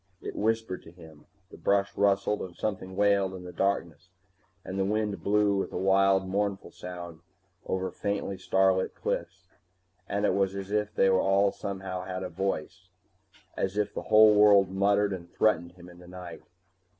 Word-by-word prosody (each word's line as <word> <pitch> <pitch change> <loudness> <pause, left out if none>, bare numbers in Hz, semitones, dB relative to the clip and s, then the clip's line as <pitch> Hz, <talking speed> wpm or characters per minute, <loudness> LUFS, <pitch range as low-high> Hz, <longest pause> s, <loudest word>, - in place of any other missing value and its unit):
It - - -7
whispered 110 -3 -1
to 80 - -14
him. 80 -3 -16 0.2
The - - -12
brush 100 0 +1
rustled 100 +1 +1
and 90 -2 -7
something 95 -3 -4
wailed 100 -1 +2
in 90 -1 -9
darkness 90 -3 -1 0.6
and 95 +1 -4
the - - +2
wind 105 0 -1
blew 105 0 +2
with 95 - -2
a - - -4
wild 95 0 +3
mournful 100 0 -2
sound 85 -2 -8 0.5
over 95 0 -2
faintly 100 -1 -3
starlit 95 0 +1
cliffs, 90 +2 -4 0.6
and 100 +1 0
it - - +2
was 95 -1 0
as 100 0 -6
if 105 0 0
they 95 - +4
all 95 +1 +3
somehow 95 -2 -5
had 95 0 -4
voice, 95 0 -4 0.7
as 95 +1 -2
if 105 -1 0
the - - -4
whole 110 0 +7
world 100 -2 +5
muttered 100 +1 +2
and 85 -2 -8
threatened 85 -5 +1
him 90 -1 -14
in 90 0 -14
the 90 - -14
night. 90 -1 -9
95 Hz, 165 wpm, -28 LUFS, 95-100 Hz, 0.7 s, whole